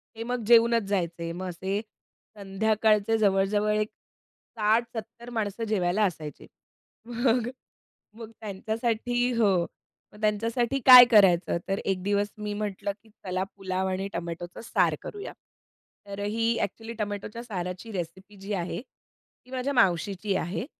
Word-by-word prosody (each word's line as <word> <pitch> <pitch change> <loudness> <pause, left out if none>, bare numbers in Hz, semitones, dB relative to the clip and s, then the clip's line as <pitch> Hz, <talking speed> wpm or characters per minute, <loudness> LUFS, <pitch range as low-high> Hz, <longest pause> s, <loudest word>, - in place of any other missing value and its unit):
ते 225 - -5
मग 245 -1 -3
जेवूनच 235 -1 +5
जायचे. 170 -3 -2
मग 185 +2 -5
असे 190 +4 -3 0.6
संध्याकाळचे 215 +2 +2
जवळजवळ 205 0 +2
एक 215 0 0 0.7
60-70 230 +2 -1
माणसं 220 -2 -3
जेवायला 205 0 +1
असायचे. 155 -5 -5 0.6
मग, 240 0 +1 0.7
मग 225 -1 -8
त्यांच्यासाठी 225 +4 -1
हो, 220 -3 +4 0.6
मग 210 - -15
त्यांच्यासाठी 230 +5 0
काय 250 -1 +12
करायचं. 190 -6 +5
तर 195 - 0
1 190 -2 -1
दिवस 205 +1 +1
मी 210 0 -4
म्हटलं, 205 -1 -3
की 225 - -22
"चला 185 -2 -4
पुलाव 190 -1 -2
आणि 190 +1 -2
टोमॅटोचं 170 +1 -6
सार - - +2
करूया." 410 0 -7 0.7
तर 200 0 -7
ही 225 +3 0
एक्चुअली 225 +3 -4
टोमॅटोच्या 210 +2 -4
साराची 185 -1 -5
रेसिपी 190 +3 -6
जी 195 +2 -6
आहे, 180 +2 -3
ती 255 -1 -29
माझ्या 260 +2 -2
मावशीची 195 -2 +1
आहे 185 +6 -3
210 Hz, 130 wpm, -27 LUFS, 190-230 Hz, 0.7 s, काय